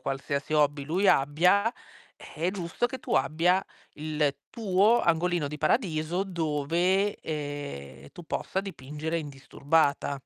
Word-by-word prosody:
qualsiasi 140 +2 -3
hobby 145 -1 +2
lui 185 +6 +1
abbia, 180 +11 +3 0.6
è 165 +4 0
giusto 185 +4 -2
che 260 +1 -7
tu - - -3
abbia 175 +4 +2 0.3
il 150 -2 -1
tuo 215 +1 +3
angolino 170 -1 +1
di 150 - -6
paradiso 175 -3 0
dove, 175 +4 0
ehm, 145 - -6
tu 175 - -11
possa 190 - -2
dipingere 160 -2 -4
indisturbata. 145 0 0
160 Hz, 115 wpm, -28 LUFS, 145-185 Hz, 0.6 s, abbia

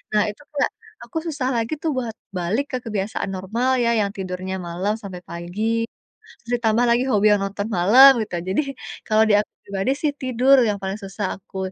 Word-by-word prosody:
Nah 210 - +5
itu - - -19 0.2
kayak, 280 - +1 0.3
aku 330 - -7
susah 290 -5 -2
lagi 230 +5 -1
tuh 320 - +1
buat 235 -3 -3 0.2
balik 200 +11 0
ke 255 - -1
kebiasaan 210 -1 -2
normal 230 +8 0
ya, 235 - +3
yang 200 - +1
tidurnya 185 0 -4
malam 185 +5 -1
sampai 190 -3 -7
pagi, 175 +4 -5 0.8
terus 235 - -10
ditambah 225 +2 +3
lagi 240 +2 +3
hobi 210 -1 +2
yang 200 - -2
nonton 200 +1 -3
malam 235 +10 +8
gitu 210 - -12
ya. 170 - -7
Jadi - - +3 0.5
kalau 220 0 +4
di - - +4
aku 210 - -4
pribadi 195 +4 -1
sih 300 -2 +2
tidur 255 +1 +4
yang 210 - +1
paling 195 +2 -4
susah 195 +1 -4
aku 190 - -12
210 Hz, 195 wpm, -22 LUFS, 195-245 Hz, 0.8 s, malam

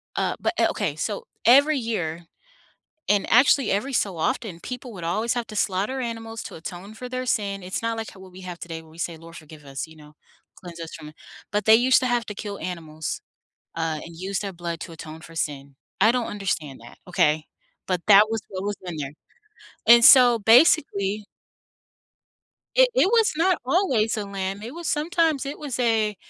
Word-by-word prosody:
uh, - - 0
but - - 0
o - - +5
okay, - - -2
so, 480 - -3 0.2
every 280 +5 +6
year, 175 -9 -3 0.8
and 205 -1 +2
actually 255 +1 +5
every 210 +8 -1
so 200 -7 0
often, 195 -2 -2
people 250 +2 -7
would 180 -5 -8
always 215 +8 0
have 240 -2 -2
to 215 - -8
slaughter 200 +7 0
animals 225 -2 -5
to - - -8
atone 180 +5 -8
for 250 +3 -8
their 255 0 -4
sin, 200 -4 -1
it's 185 +4 -4
not 230 0 -1
like 225 -1 -5
how 190 - -15
what 190 -1 -13
we 185 +1 -12
have 180 -2 -7
today 165 -2 -7
where 160 - -18
we 160 - -17
say, 170 -1 -3
"Lord, 165 +1 -13
forgive 155 -1 -13
us, 135 0 -5
you 160 0 -16
know, 150 0 -16 0.5
cleanse 170 -2 -10
us 165 -1 -7
from 150 - -9
it," 155 - -14 0.4
but 210 0 -1
they 220 - +7
used 250 +3 +5
to 255 - -1
have 240 -2 0
to 210 - -6
kill 200 0 -6
animals, 160 -3 -5 0.6
uh, 165 -2 -2
and 170 - -11
use 190 +3 -3
their 200 -2 -5
blood 170 -1 -5
to 170 - -7
atone 160 -1 -10
for 165 +1 -13
sin. 140 -3 -4 0.3
I 220 - +6
don't 245 -1 -1
understand 175 -9 -3
that, 120 - -14
okay? 155 -3 +2 0.4
B 185 - 0
ut 180 - -1
that 205 0 +8
was 225 -1 -2
what 190 -1 -5
was 205 0 -3
in 175 -3 -6
there. 140 -2 -5 0.7
And, 235 +1 +8
so, 245 -2 +8
basically 215 - +4 1.5
It - - +6
it - - +4
was 450 +1 +3
not 355 +3 +2
always 260 - +2
a 210 - -3
lamb, 195 0 -4
it 235 +6 -7
was 340 -1 -6
sometimes 315 -2 +1
it 285 +3 -6
was 285 -5 -4
a 220 -3 +1
205 Hz, 205 wpm, -24 LUFS, 170-245 Hz, 1.5 s, that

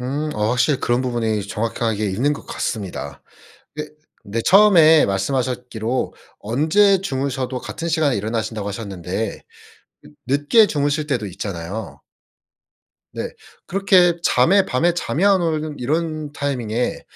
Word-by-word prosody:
음 140 +5 -3
어 105 +1 0
확실히 125 +3 +2
그런 120 +1 +1
부분이 115 -4 -1
정확하게 110 -1 -2
있는 130 +10 +1
것 - - -7
같습니다. 85 - -5 0.5
그게 150 0 -5 0.3
근데 110 +2 -3
처음에 175 -6 +6
말씀하셨기로 125 +3 -2 0.3
"언제 160 - +3
주무셔도 135 -6 -2
같은 170 - -5
시간에 155 -5 +1
일어나신다."고 110 0 -3
하셨는데 100 0 -5 0.6
늦 75 - -17
늦게 145 - +4
주무실 145 -1 -1
때도 120 -7 -1
있잖아요. 95 +2 -6 1.1
네 - - -4 0.4
그렇게 185 -3 +3
잠에 195 +3 +4
밤에 170 +8 +2
잠이 175 +1 -1
안 195 -2 +5
오는 155 -3 -2
이런 155 +3 -2
타이밍에, 125 -5 -2
130 Hz, 300 characters per minute, -20 LUFS, 110-155 Hz, 1.1 s, 처음에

